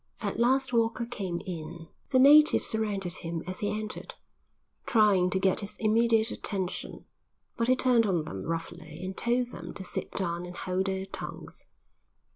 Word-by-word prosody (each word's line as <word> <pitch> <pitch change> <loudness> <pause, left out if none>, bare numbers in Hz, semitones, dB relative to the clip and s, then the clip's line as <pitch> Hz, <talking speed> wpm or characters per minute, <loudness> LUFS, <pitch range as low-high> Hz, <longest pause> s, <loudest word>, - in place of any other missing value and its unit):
At - - -3
last 260 +2 +2
Walker 230 +1 +1
came 195 -8 -4
in. 165 -1 -7 0.2
The 260 - +3
natives 295 +3 +7
surrounded 200 -5 -1
him 165 -1 -5
as 185 +1 -5
he 205 - -1
entered, 215 0 -5 0.7
trying 205 -6 +4
to 190 - 0
get 190 0 +2
his 210 0 -5
immediate 225 +1 +3
attention, 190 -3 -4 0.5
but 230 - 0
he 255 - +5
turned 245 -3 +3
on 175 -5 0
them 95 -10 -6
roughly 165 -1 -5
and 190 0 -5
told 245 +1 0
them 170 -4 -8
to 195 - -5
sit - - -5
down 175 -2 -2
and 180 - -9
hold 185 +2 -2
their 190 0 -2
tongues. 195 - -8
195 Hz, 165 wpm, -28 LUFS, 175-230 Hz, 0.7 s, natives